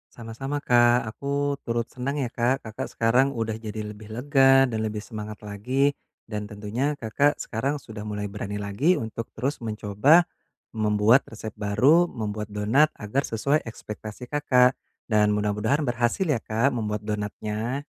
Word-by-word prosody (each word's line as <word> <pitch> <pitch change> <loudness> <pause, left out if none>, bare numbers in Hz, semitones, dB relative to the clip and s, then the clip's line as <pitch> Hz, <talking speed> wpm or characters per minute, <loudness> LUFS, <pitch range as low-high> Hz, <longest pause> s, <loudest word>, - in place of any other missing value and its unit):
Sama-sama 120 +5 -5
Kak, 120 -3 +4
aku 140 +5 -2
turut 115 0 -1
senang 135 +3 -4
ya 130 -5 -2
Kak, 125 +2 0
Kakak 110 -1 -5
sekarang 125 +4 +3
udah 115 -4 -2
jadi 110 -1 -5
lebih 105 +1 -13
lega 135 +2 +4
dan 115 -4 -2
lebih 105 -1 -3
semangat 105 -2 -7
lagi, 130 +8 0 0.3
dan 105 -2 -5
tentunya 115 +8 -2
Kakak 140 +6 +1
sekarang 135 +6 -2
sudah 110 -6 -9
mulai 105 -1 -4
berani 100 0 -5
lagi 105 - +1
untuk 115 0 -5
terus 130 +2 -2
mencoba 110 - +3 0.5
membuat 110 +3 +4
resep 110 -1 -7
baru, 135 +13 +3
membuat 105 -2 -4
donat 110 +9 +3
agar 105 +6 -1
sesuai 140 +5 0
ekspektasi 110 +1 -8
Kakak. 130 -2 +3 0.4
Dan 105 -1 +4
mudah-mudahan 105 +7 0
berhasil 120 - 0
ya 145 -9 0
Kak 115 +5 +1
membuat 105 -2 -3
donatnya. 105 +5 -3
115 Hz, 145 wpm, -25 LUFS, 105-135 Hz, 0.5 s, Kak